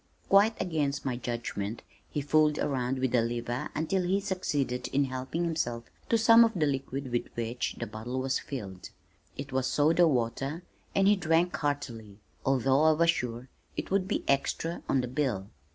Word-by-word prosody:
Quite 205 +3 +5
against 145 -5 -1
my 130 -2 0
judgment 115 -3 -4 0.3
he 145 - -2
fooled 150 +1 +3
around 130 -2 -1
with 130 -1 0
the 120 -1 +4
lever 120 +1 -3 0.2
till 190 +2 +1
he 185 +2 +1
succeeded 150 -10 -2
in 140 +1 +1
helping 130 +5 -3
himself 120 -9 -1 0.3
to 230 - +4
some 230 +1 +7
of 225 -1 +1
the 160 -4 +2
liquid 135 -1 -3
with 120 - -1
which 120 +1 -2
the 115 - -3
bottle 115 +4 -5
was 130 0 0
filled. 100 -9 -7 0.5
It 140 +1 -6
was 130 0 0
soda 165 +4 +4
water 135 +4 -1 0.3
and 195 0 +4
he 205 - +6
drank 170 -1 +1
heartily, 120 -8 -3 0.3
although 135 +1 +3
I 160 - +6
was 165 +2 +4
sure 125 -3 -4 0.3
it - - -4
would 190 -1 +1
be - - -1
extra 150 +4 0
on 135 - +3
the 125 - -3
bill. 120 -7 -2
135 Hz, 175 wpm, -29 LUFS, 120-165 Hz, 0.5 s, some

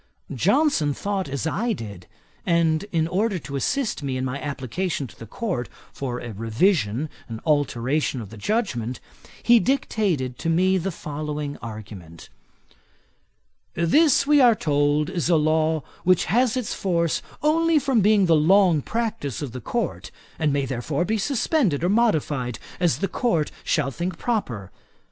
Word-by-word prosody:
Johnson 185 - +2
thought 200 -5 -2
as 140 +2 -3
I 225 +8 0
did; 100 - -8 0.4
and 170 0 +2
in 160 -2 +1
order 195 +3 0
to 140 -4 -7
assist 230 - -1
me 135 -2 -2
in 130 - -2
my 130 +2 -4
application 145 +3 -3
to 120 - -12
the 115 - -11
Court 175 - -3 0.2
for 125 -3 -4
a 120 -2 -7
revision 115 - +1 0.2
and 115 -1 -5
alteration 145 -2 +1
of 110 -4 -8
the 110 - -10
judgement, 125 - -2 0.4
he 240 0 +6
dictated 195 - 0
to 165 - -2
me 185 +3 +3
the 185 +3 -2
following 150 -2 -5
argument: 100 -8 -10 1.5
'This, 275 - +4
we 295 0 +5
are 240 -3 +6
told, 145 -2 +1
is 175 -3 -1
a 170 - +5
law 155 0 +2 0.2
which 185 -1 +3
has 245 +5 +2
its 250 -4 -2
force 170 -4 0 0.2
only 325 +1 +3
from 270 -6 +2
the 210 +2 +4 0.2
long 170 0 +4
practice 225 - -3
of 135 - -5
the 125 +1 -7
Court: - - -3 0.3
and 155 -2 +2
may, 140 -1 0
therefore, 135 +5 -2
be 220 +2 0
suspended 230 - +1
or 175 - +2
modified 150 - +1 0.2
as 170 -8 +2
the 195 - -1
Court 175 - 0
shall 140 -3 0
think 170 +4 -4
proper. 125 - -2
160 Hz, 155 wpm, -24 LUFS, 135-205 Hz, 1.5 s, he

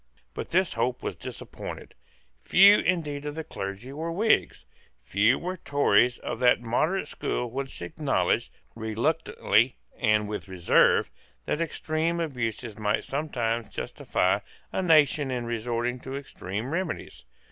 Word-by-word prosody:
But - - -5
this 185 +2 +2
hope 120 +2 -1
was - - -3
disappointed. - - -8 0.5
Few 200 - +7
indeed 150 -5 -1
of 145 - -4
the 160 - -4
clergy 100 +3 -6
were 160 +3 -3
Whigs. 195 - +1 0.4
Few 110 +6 +3
were 185 +1 -4
Tories 140 -5 +3
of - - -5
that 125 -1 +5
moderate 145 +10 0
school 120 -5 -3
which 135 -6 -5
acknowledged, 120 - 0 0.2
reluctantly 115 +1 +1 0.2
and 105 -2 +2
with 105 -1 -5
reserve, 90 -3 +3 0.3
that 155 - -1
extreme 165 +1 -1
abuses 120 -7 -3
might 105 0 +1
sometimes 120 -6 -2
justify - - 0 0.3
a - - 0
nation 155 -5 +4
in 125 -2 -2
resorting 120 +1 -2
to 135 +2 -6
extreme 115 -3 -5
remedies. 180 -2 -4
125 Hz, 130 wpm, -27 LUFS, 115-155 Hz, 0.5 s, Few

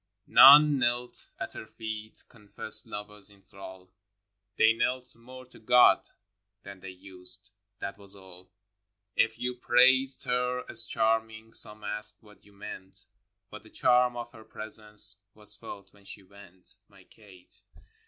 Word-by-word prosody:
VI. - - -25
None 145 +1 +8
knelt 120 0 -3
at - - -6
her - - -10
feet 110 -1 -9
confessed 110 0 +2
lovers 105 0 -1
in 100 -1 -17
thrall; 95 -2 -14 0.6
They 110 +1 +4
knelt 125 +2 -3
more 130 +2 -14
to - - -18
God 125 +3 +4 0.5
than 100 -1 -12
they 95 - -10
used, 95 +2 -10 0.3
that 100 +1 -8
was 100 0 -2
all; 95 -1 -15 0.7
If 115 0 0
you 125 0 -4
praised 130 +2 +3
her 125 0 -2
as 115 -1 +4
charming, 110 0 -2
some 105 -1 0
asked 105 +1 -2
what 105 -1 -21
you 105 - -22
meant, 100 -1 -8 0.5
But - - -10
the - - -19
charm 125 0 +1
of 120 0 -8
her 110 - -15
presence 105 -2 -1 0.2
was 105 -1 +4
felt 100 - -12
when 100 -1 -23
she 100 - -5
went 95 -1 -18
— 100 - -55
My 100 -2 -20
Kate. 95 -3 -19
105 Hz, 155 wpm, -27 LUFS, 100-120 Hz, 0.7 s, None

